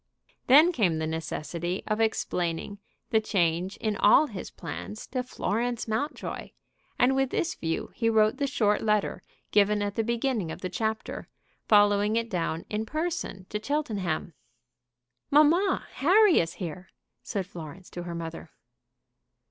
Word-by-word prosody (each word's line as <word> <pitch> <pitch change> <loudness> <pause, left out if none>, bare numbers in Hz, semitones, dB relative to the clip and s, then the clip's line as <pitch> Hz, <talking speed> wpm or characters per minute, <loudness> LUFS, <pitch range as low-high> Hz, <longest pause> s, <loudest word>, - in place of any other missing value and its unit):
Then 300 +7 +7
came 195 - +1
the 160 - -1
necessity 165 +2 -3
of 215 +1 0
explaining 180 -3 -1 0.3
the 220 - +4
change 180 -2 0
in 215 -2 -1
all 215 +9 +6
his 205 -10 -7
plans 85 +7 -7
to 255 - -2
Florence 240 -1 -2
Mountjoy, 225 +8 -3 0.5
and 255 +2 +4
with 270 -1 +1
this 335 - -1
view 165 0 -3
he 230 -2 +1
wrote 215 -1 +3
the 280 - 0
short 210 -6 +1
letter 210 -2 0 0.3
given 205 0 +3
at 205 0 -2
the 225 - 0
beginning 235 -4 -1
of - - -8
the 185 - -3
chapter, 220 +3 -3 0.4
following 205 0 +4
it 230 0 -1
down 165 -2 -2
in 215 +1 -2
person 310 - -3
to 210 - -3
Cheltenham. 205 - -2 1.0
"Mamma, 320 +7 +4
Harry 380 +5 +5
is 165 +1 -1
here," 180 0 -7 0.3
said 195 -3 -3
Florence 170 +2 -10
to 175 - -6
her 175 -1 -6
mother. 165 -1 -6
210 Hz, 145 wpm, -27 LUFS, 175-245 Hz, 1.0 s, Then